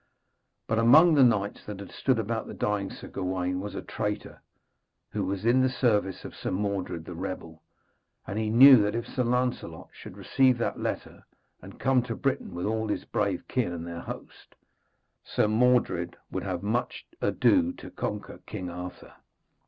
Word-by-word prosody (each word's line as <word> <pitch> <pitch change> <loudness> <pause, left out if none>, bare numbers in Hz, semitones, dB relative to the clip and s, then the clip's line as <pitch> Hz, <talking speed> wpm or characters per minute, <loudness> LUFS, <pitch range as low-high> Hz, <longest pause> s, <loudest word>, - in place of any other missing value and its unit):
But, 110 - 0
among 155 +9 +7
the 140 -3 +6
knights 105 -4 +2
that 105 -2 -6
had 100 - -9
stood 130 -3 +1
about 110 +1 -2
the - - -8
dying 105 -2 -1
Sir - - -10
Gawaine, 90 -1 -2
was 100 +2 -6
a - - -5
traitor, 105 -1 -4 0.7
who - - -2
was 100 +2 -3
in 125 +3 +4
the 130 - +3
service 105 -7 0
of - - -8
Sir - - -4
Mordred 95 -4 -2
the 90 - -7
rebel, 85 -2 -6 0.6
and 100 - -3
he 110 -1 -1
knew 130 +2 +9
that 105 +1 0
if 115 - -2
Sir 125 - -1
Lancelot 125 -9 -1
should - - -11
receive 130 -2 +3
that 120 - -2
letter, - - -4 0.4
and - - -12
come 130 -1 +3
to 115 -1 -5
Britain 135 -9 -2
with 90 - -3
all 110 +1 -1
his 105 - -2
brave 100 -4 -1
kin 125 -8 0
and 85 -1 -5
their 85 0 -6
host, - - -10 0.7
Sir - - +1
Mordred 110 -6 +2
would - - -2
have 90 -2 -4
much 115 +4 -2 0.2
ado 265 -2 +3
to - - -11
conquer 105 0 -5
King 90 -5 -5
Arthur. 90 +1 -8
105 Hz, 175 wpm, -27 LUFS, 95-125 Hz, 0.7 s, knew